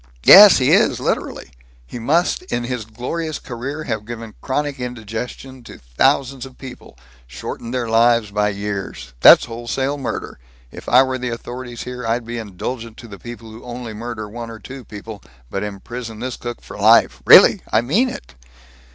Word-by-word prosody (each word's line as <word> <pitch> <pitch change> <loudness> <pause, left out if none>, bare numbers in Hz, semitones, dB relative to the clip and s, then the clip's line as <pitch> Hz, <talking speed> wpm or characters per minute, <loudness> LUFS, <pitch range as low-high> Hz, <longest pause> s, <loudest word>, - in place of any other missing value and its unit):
"Yes 200 0 +10
he 130 - +2
is, - - +3
literally. - - -3 0.3
He 120 - -8
must 160 +9 +1
in 120 0 -1
his 120 -2 -4
glorious 150 +9 -5
career 135 +5 -6
have 110 -6 -3
given 115 -1 -8
chronic 145 0 -2
indigestion 125 +2 -7
to - - -11
thousands 125 - 0
of 130 -1 -11
people 125 - -12 0.3
shortened 65 - -7
their 125 -2 -2
lives 115 -1 +3
by 105 0 +1
years. 100 -10 -6
That's - - +8
wholesale 120 +5 -3
murder. 130 - -5 0.3
If - - -9
I 125 +2 +6
were 130 -1 -3
the 125 0 -3
authorities 120 0 -7
here, 125 0 -7
I'd 115 +1 -1
be 120 0 -5
indulgent 115 +3 -6
to 120 - -11
the 100 -2 -11
people 120 -2 -10
who 110 +2 -12
only 120 -2 -7
murder 110 0 -6
one 115 +2 -8
or 115 - -9
two 130 +5 -10
people, 105 -1 -10 0.3
but 100 - -3
imprison 110 +3 -7
this 125 +1 -4
cook 120 -1 -7
for - - -11
life. - - +4
Really! - - +8
I 110 - +3
mean 195 - +1
it!" - - -10
120 Hz, 175 wpm, -19 LUFS, 110-130 Hz, 0.3 s, Yes